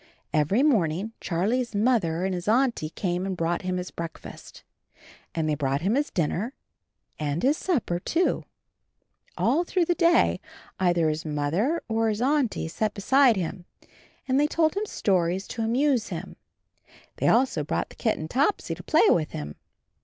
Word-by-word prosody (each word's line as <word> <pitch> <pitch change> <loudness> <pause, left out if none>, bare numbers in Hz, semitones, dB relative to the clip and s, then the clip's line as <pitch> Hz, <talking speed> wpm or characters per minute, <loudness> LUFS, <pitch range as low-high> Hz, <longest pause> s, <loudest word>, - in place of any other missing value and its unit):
Every 155 - +2
morning 205 - +1
Charlie's 220 +7 -1
Mother 205 -7 +1
and 190 - -1
his 180 +1 -5
Auntie 230 -8 +2
came 175 +1 -2
and 190 -1 -3
brought 170 +1 -1
him 185 -1 -2
his 180 0 -5
breakfast, 165 -1 -9 0.7
and 160 -1 0
they 155 - +1
brought 140 -1 -1
his 235 - +1
dinner 190 - -2 0.6
and 150 +1 -2
his 280 +4 +4
supper, 260 - -1
too. 335 - 0 0.9
All 330 +5 +2
through 355 0 0
the 350 - +2
day 340 -1 +3 0.4
either 175 -3 +2
his 155 +1 -1
Mother 160 - -1
or 225 0 +1
his 210 -1 -2
Auntie 260 - +1
sat 210 +5 -2
beside 260 +4 +4
him 180 -1 -4 0.6
and 260 +1 +2
they 295 - +3
told 315 +1 +1
him 420 +2 -2
stories 185 - 0
to 230 - -4
amuse 245 +1 +1
him. - - -6 0.8
They - - 0
also 240 - +3
brought 145 - -2
the - - -14
kitten 215 -9 -1
Topsy 285 - 0
to - - -8
play - - +4
with 155 -3 +1
him. 75 0 -6
205 Hz, 160 wpm, -26 LUFS, 170-260 Hz, 0.9 s, his